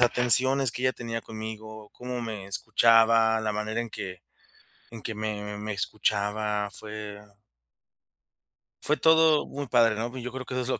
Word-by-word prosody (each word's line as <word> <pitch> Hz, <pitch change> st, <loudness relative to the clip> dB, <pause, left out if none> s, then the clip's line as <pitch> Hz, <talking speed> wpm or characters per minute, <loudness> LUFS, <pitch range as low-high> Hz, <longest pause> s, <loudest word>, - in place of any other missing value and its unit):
atenciones 125 Hz, +2 st, +5 dB
que 125 Hz, -, -6 dB
ella 130 Hz, 0 st, +2 dB
tenía 115 Hz, -2 st, -5 dB
conmigo, 110 Hz, -1 st, -9 dB
cómo 125 Hz, 0 st, -6 dB
me 110 Hz, -4 st, -6 dB
escuchaba, 115 Hz, +2 st, +3 dB
la 110 Hz, -1 st, -2 dB
manera 105 Hz, +2 st, -3 dB
en 120 Hz, -1 st, -5 dB
que 90 Hz, -3 st, -7 dB, 0.7 s
en 115 Hz, -1 st, -9 dB
que 110 Hz, -, -5 dB
me 105 Hz, -1 st, -4 dB
me 105 Hz, +1 st, -5 dB
escuchaba, 105 Hz, +2 st, -1 dB
fue 105 Hz, 0 st, -8 dB, 1.7 s
fue 150 Hz, -, +1 dB
todo 160 Hz, -1 st, +4 dB
muy 145 Hz, 0 st, -6 dB
padre, 115 Hz, -3 st, +3 dB
¿no?, 115 Hz, +3 st, -3 dB
y -, -, -5 dB
yo 125 Hz, +1 st, -6 dB
creo 130 Hz, 0 st, -5 dB
que 125 Hz, -, -6 dB
eso 130 Hz, -, 0 dB
es -, -, -6 dB
lo 130 Hz, -, -1 dB
que -, -, -23 dB
110 Hz, 170 wpm, -26 LUFS, 105-125 Hz, 1.7 s, atenciones